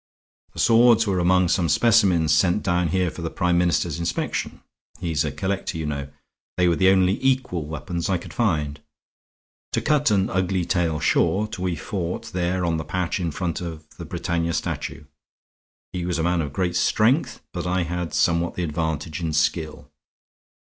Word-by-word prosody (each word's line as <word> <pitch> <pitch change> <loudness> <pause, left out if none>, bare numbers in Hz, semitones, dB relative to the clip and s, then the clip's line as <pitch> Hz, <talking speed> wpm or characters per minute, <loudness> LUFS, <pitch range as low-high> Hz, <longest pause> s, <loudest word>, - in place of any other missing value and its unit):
The - - -9
swords 115 0 +5
were 95 -3 0
among 90 +1 +3
some 85 -3 +1
specimens 95 -9 +4
sent 90 +6 +2
down 90 -2 +1
here 90 +1 0
for - - -9
the 85 - -2
Prime 90 -1 +1
Minister's 85 -2 +1
inspection; 85 0 -3 0.4
he 85 -2 -3
is 75 -3 +1
a - - -2
collector, 95 -3 -3
you 80 - -3
know; 70 -2 -3 0.5
they 90 -1 +3
were 85 - +3
the 95 +3 +4
only 95 +2 +2
equal 125 - 0
weapons 85 +4 -4
I 95 - +2
could 85 - -10
find. 75 -10 0 0.9
To - - +2
cut 150 -3 +2
an 100 -2 +1
ugly 95 -1 0
tale 85 -4 0
short, 105 +7 +1
we 90 -1 -1
fought 85 +2 -4
there 90 0 0
on 85 -1 0
the 80 - -3
path 90 +4 -2
in 85 -2 -1
front 85 +2 -3
of 80 -3 -7
the - - -7
Britannia 85 -1 -2
statue; - - -3 0.9
he 90 -1 -3
was 90 -1 -1
a 80 - -1
man 85 0 +1
of 75 -3 -4
great 90 +3 -1
strength, 115 - +2
but - - -3
I 90 0 +1
had 85 0 -3
somewhat 85 0 +1
the 90 - -2
advantage 80 0 -3
in 80 -2 -2
skill. 75 0 -1
90 Hz, 180 wpm, -23 LUFS, 80-95 Hz, 0.9 s, swords